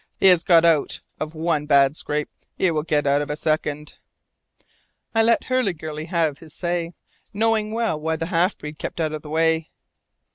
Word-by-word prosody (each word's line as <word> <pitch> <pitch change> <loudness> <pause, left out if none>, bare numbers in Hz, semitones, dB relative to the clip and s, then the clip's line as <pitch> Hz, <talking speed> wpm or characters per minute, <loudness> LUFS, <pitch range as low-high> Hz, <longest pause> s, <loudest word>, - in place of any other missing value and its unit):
He - - 0
has 180 -2 +5
got 170 -2 +5
out 160 -4 +2 0.2
of 155 +1 -5
one 155 -2 -1
bad 140 -1 +4
scrape; 150 -1 -3 0.3
he 185 - +2
will 155 -2 0
get 150 -2 0
out 140 +1 +3
of 145 - -4
a 150 - -2
second!" 150 -1 -2 1.2
I 225 - +3
let 230 +1 +3
Hurliguerly 165 -12 -2
have 160 -4 0
his 160 -1 -10
say, 175 -1 -2 0.4
knowing 220 0 +1
well 225 -8 -1
why 160 +1 -1
the 165 - -3
half 180 +3 +1
breed 150 +1 -9
kept - - -5
out 155 -1 -1
of 155 - -5
the 150 - -11
way. 160 0 +1
160 Hz, 185 wpm, -22 LUFS, 150-175 Hz, 1.2 s, has